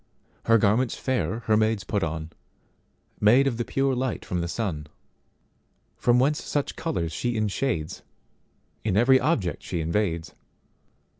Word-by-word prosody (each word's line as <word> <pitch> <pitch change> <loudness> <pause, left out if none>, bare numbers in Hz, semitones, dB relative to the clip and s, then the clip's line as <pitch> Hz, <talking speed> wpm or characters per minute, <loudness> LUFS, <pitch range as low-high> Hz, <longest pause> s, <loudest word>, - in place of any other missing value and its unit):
Her 115 0 +5
garments 110 +4 +2
fair 125 -3 -1
her 110 -1 +2
maids 110 -1 +1
put 105 - -1
on, 80 -1 -3 0.9
Made 120 +6 +5
of 130 -4 0
the 120 - -1
pure 135 +2 0
light 130 -1 -2
from 90 -1 -2
the 85 - -2
sun, 85 -5 -3 1.1
From 120 0 +3
whence 140 +4 +2
such 145 -1 -2
colours 85 - -2
she 120 +9 -2
inshadesIn 110 - -1 0.8
every 120 +6 +4
object 110 - 0
she 90 - -4
invades. 85 0 -1
110 Hz, 135 wpm, -26 LUFS, 85-130 Hz, 1.1 s, Her